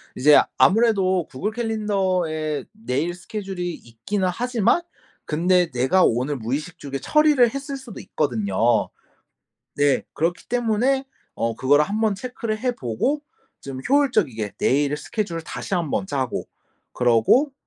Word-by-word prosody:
이제 145 +3 +6 0.2
아무래도 190 - +3
구글 195 +12 -3
캘린더에 190 -9 -1
내일 170 - -2
스케줄이 180 -1 -5
있기는 155 - -3
하지만 245 - +1 0.4
근데 175 +2 +2
내가 130 +10 +3
오늘 130 +5 0
무의식중에 140 +4 -4
처리를 300 -6 +4
했을 275 0 -4
수도 260 -6 -10
있거든요. 115 - 0 0.9
네. 145 -1 +3
그렇기 170 +2 -2
때문에 245 +3 +1 0.3
어 115 0 -1
그거를 145 +3 +4
한번 215 0 0
체크를 230 0 -4
해 250 +1 -1
보고 185 - -1 0.4
좀 135 -1 -6
효율적이게 210 - +1
내일의 145 +2 +2
스케줄을 200 -8 -3
다시 180 - -7
한번 170 +1 -1
짜고 135 -8 -2 0.5
그러고 125 - +3
180 Hz, 295 characters per minute, -23 LUFS, 140-225 Hz, 0.9 s, 이제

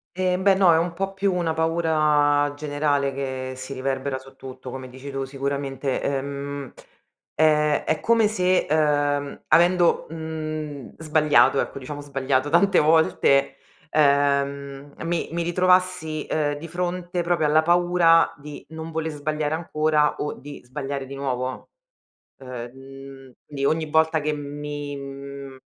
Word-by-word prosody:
Ehm, 185 0 0
beh, 195 0 +5
no 185 -3 +5
è - - +4
un 170 0 -1
po' 195 +2 -3
più 195 0 0
una 170 -3 0
paura 155 -3 +2
generale 145 -1 0
che 130 -1 -4
si 130 +1 -7
riverbera 135 0 -2
su 130 0 -14
tutto, 130 -1 -9
come 130 0 -7
dici 130 +2 -9
tu, 135 0 -3
sicuramente, 135 0 -3
ehm, 140 0 -4 0.6
ehm, 150 -1 +3
è - - 0
come 230 -2 +3
se, 185 -3 +1
uhm, 145 -2 +1
avendo, 175 0 +4
mhmm, 155 -3 -6
sbagliato, 155 -3 +3
ecco, - - -3
diciamo 145 +2 -7
sbagliato, 135 -1 -1
tante 180 +5 +4
volte, 140 -3 +3 0.3
ehm, 140 -1 +1
mi 170 0 -2
mi 170 0 -1
ritrovassi, 180 -3 +1
uhm, 150 -2 +1
di 160 +3 -8
fronte 175 +1 -3
proprio 170 -2 +1
alla 155 +1 +4
paura 175 0 +4
di 145 0 -10
non 160 0 -7
vole 160 0 -2
sbagliare 150 0 -2
ancora 155 -2 +1
o 150 - -3
di 145 0 -11
sbagliare 135 +1 -5
di 135 - -9
nuovo, 130 -2 -4 0.7
uhm, 130 - -12 0.3
mhmm, 135 0 -12
quindi 140 -2 -4
ogni 160 +1 +1
volta 160 +1 +3
che 150 +1 -1
mi 145 0 -5
mhmm, 140 0 -8
150 Hz, 140 wpm, -24 LUFS, 140-160 Hz, 0.7 s, beh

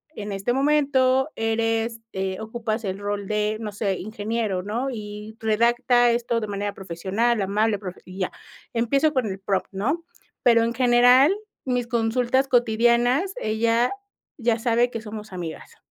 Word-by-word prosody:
en 205 -1 -5
este 195 +4 -1
momento 270 -1 +3
eres 225 0 -1
eh, 190 0 -3
ocupas 220 0 -3
el 190 -1 -3
rol 205 -1 -3
de, 210 0 0
no 215 -2 -5
sé, 200 -2 -1
ingeniero, 215 -1 -2
¿no?, 235 +6 -2
y 210 -1 -7
redacta 240 +2 +3
esto 235 0 0
de 215 - -4
manera 205 0 -3
profesional, 195 +6 -1
amable, 205 +2 +1
profe 185 -3 -8
y 185 +1 -10
ya. 185 - -1 0.4
Empiezo 275 +6 +2
con 260 -4 +1
el 190 -1 -5
prompt, 195 -1 -1
¿no? 275 - -1 0.4
Pero, 230 -2 +5
en 230 +1 0
general, 250 +6 +5 0.3
mis 245 -2 -1
consultas 245 +3 +1
cotidianas, 240 - +3
ella 230 +2 +1 0.5
ya 235 -2 +1
sabe 240 +1 +2
que 230 -2 -5
somos 215 -2 -8
amigas. 170 -3 -7
225 Hz, 150 wpm, -24 LUFS, 205-245 Hz, 0.5 s, Pero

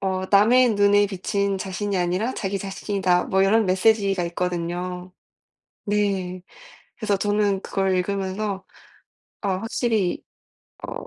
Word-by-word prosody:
어 190 -1 -2
남의 230 +3 +5
눈에 205 0 +4
비친 200 0 -1
자신이 195 +1 -3
아니라 180 +8 0
자기 195 -1 -3
자신이다." 195 -2 0
뭐 190 0 +2
이런 215 +2 +3
메시지가 195 0 +2
있거든요. 180 +1 -3 0.8
네 195 -3 -1 0.5
그래서 205 -3 0
저는 205 -1 +1
그걸 195 -2 0
읽으면서 195 +1 -2 0.8
어 200 - -1
확실히 210 0 -1 0.6
어 - - -7
195 Hz, 255 characters per minute, -23 LUFS, 185-205 Hz, 0.8 s, 남의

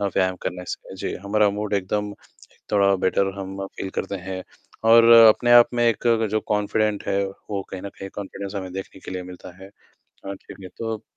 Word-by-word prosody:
अ, - - -1
व्यायाम 95 -2 0
करने 90 0 -4
से। 95 - -7
जी, - - -4
हमारा 105 +1 +3
मूड 105 0 -3
एकदम 100 +2 -1 0.6
थोड़ा 100 -1 +4
बेटर 95 +1 +1
हम 95 0 -6
फ़ील 95 - -7
करते 100 - -3
हैं, 95 0 -6 0.4
और 115 +1 +7
अपने 115 +1 +7
आप 120 0 +8
में 120 0 +2
एक 115 +1 -1 0.2
जो 110 - +1
कॉन्फ़िडेंट 105 0 0
है, 100 0 +1 0.3
वो 100 -2 -2
कहीं 95 - -6
न 100 - -5
कहीं 95 - -6
कॉन्फ़िडेंस 100 0 -7
हमें 95 -2 -5
देखने 95 0 -8
के - - -7
लिए 90 0 -4
मिलता 90 0 -11
है 95 - -10 0.6
अ, 100 - -5
ठीक - - -13
है, 95 - -8
तो 115 0 -5
100 Hz, 200 wpm, -23 LUFS, 95-105 Hz, 0.6 s, आप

